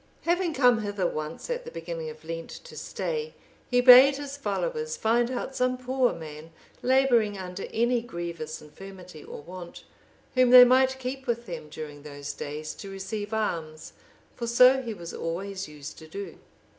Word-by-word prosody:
Having 345 -1 +1
come 245 -4 +4
hither 205 -3 -2
once 155 -1 -4
at - - -2
the - - -8
beginning 165 -1 -6
of 155 0 -12
Lent 165 0 -5
to - - -11
stay, 470 -1 -4 0.3
he 245 -1 +4
bade 255 +2 +9
his 285 -1 -6
followers 470 - -2
find 235 +2 +2
out 260 +1 -4
some 255 0 +1
poor 255 0 +1
man 160 0 -9 0.3
labouring 245 -5 +3
under 185 0 -6
any 240 +1 +2
grievous 170 -7 -6
infirmity, 180 0 -12
or - - -9
want, 175 +1 -10 0.5
whom 255 -1 +4
they 250 0 +11
might 260 +1 +4
keep 265 +1 -5
with 235 0 -1
them 170 -4 -7
during 150 -1 -8
those 145 -1 -7
days, 150 +1 -6
to 200 - -9
receive 205 +2 -5
alms, 165 -8 -3 0.4
for 235 - -4
so 250 +3 +6
he 230 -4 -5
was 170 -3 -8
always 190 +3 -4
used 150 -1 -10
to 160 - -12
do. 200 +5 -8
210 Hz, 170 wpm, -27 LUFS, 165-255 Hz, 0.5 s, they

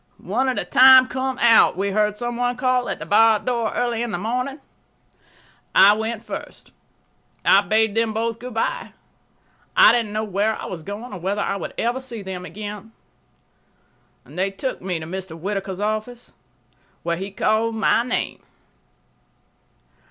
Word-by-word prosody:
"One 250 +8 -1
at 255 - -2
a - - -2
time, 260 0 +8
come 260 0 -3
out," 230 -7 +5
we 200 +1 -1
heard 210 +1 +1
some 240 +1 -4
one 245 0 -1
call 255 -1 0
at - - -3
the - - -7
barred 220 0 +4
door 235 -3 -1
early 240 -2 -1
in 240 - -2
the 205 - -3
morning. 250 - -3 1.2
I 200 +2 +8
went 220 +1 -4
first. - - -9 0.7
I - - +6
bade 220 -1 +1
them 225 0 +1
both 230 +1 -2
good 245 -1 -8
by. - - -2 0.8
I - - +8
didn't 230 -3 0
know 215 +1 -2
where 210 +1 0
I - - -6
was 175 -3 -6
going 205 +7 -8
or 180 - -6
whether 195 +4 -2
I 195 - -2
would 200 - -6
ever 240 +3 -1
see 235 -5 -7
them 185 -1 -6
again. 210 +4 -8 1.3
They 190 +2 -2
took 195 +7 -5
me 180 -1 -3
to 160 - -7
Mr. 180 -1 -7
Whittaker's 195 +1 -4
office, 215 +3 -4 0.7
where 170 0 -1
he 195 +3 -5
called 220 +3 0
my 225 +1 +2
name. 245 0 -3
220 Hz, 165 wpm, -22 LUFS, 195-240 Hz, 1.3 s, time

